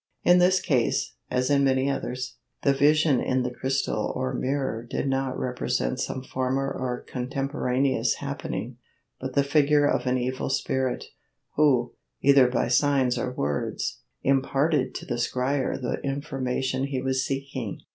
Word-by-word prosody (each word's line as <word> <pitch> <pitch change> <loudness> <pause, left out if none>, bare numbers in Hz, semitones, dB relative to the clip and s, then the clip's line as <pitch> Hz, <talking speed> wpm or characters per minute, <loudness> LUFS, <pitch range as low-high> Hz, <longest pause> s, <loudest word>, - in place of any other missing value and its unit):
In 180 0 +6
this 185 +1 +4
case, 130 -11 +1 0.2
as 125 +2 0
in 140 -1 +4
many 130 0 +2
others, 130 -2 -3 0.3
the 140 - +4
vision 145 0 +4
in 130 0 0
the 125 - -2
crystal 135 +2 -1
or 65 - -2
mirror 130 -4 -1
did 120 +4 -3
not 135 -1 -1
represent 125 - -1
some 130 - -3
former 130 +1 -1
or 125 -1 -3
contemporaneous 135 0 0
happening, 120 +2 -5 0.4
but 130 0 -5
the 140 - +4
figure 145 0 +3
of - - 0
an 125 0 +2
evil 130 +1 -2
spirit, 130 -1 -1 0.5
who, 130 -5 +3 0.3
either 140 -2 +6
by 125 - 0
signs 130 0 +3
or 125 +1 -2
words, 70 - -2 0.2
imparted 135 +1 +1
to - - -5
the - - -3
scryer 130 +3 0
the 125 - -3
information 135 -2 -2
he 135 -2 -2
was 130 0 0
seeking. 135 -5 -4
130 Hz, 145 wpm, -26 LUFS, 125-140 Hz, 0.5 s, In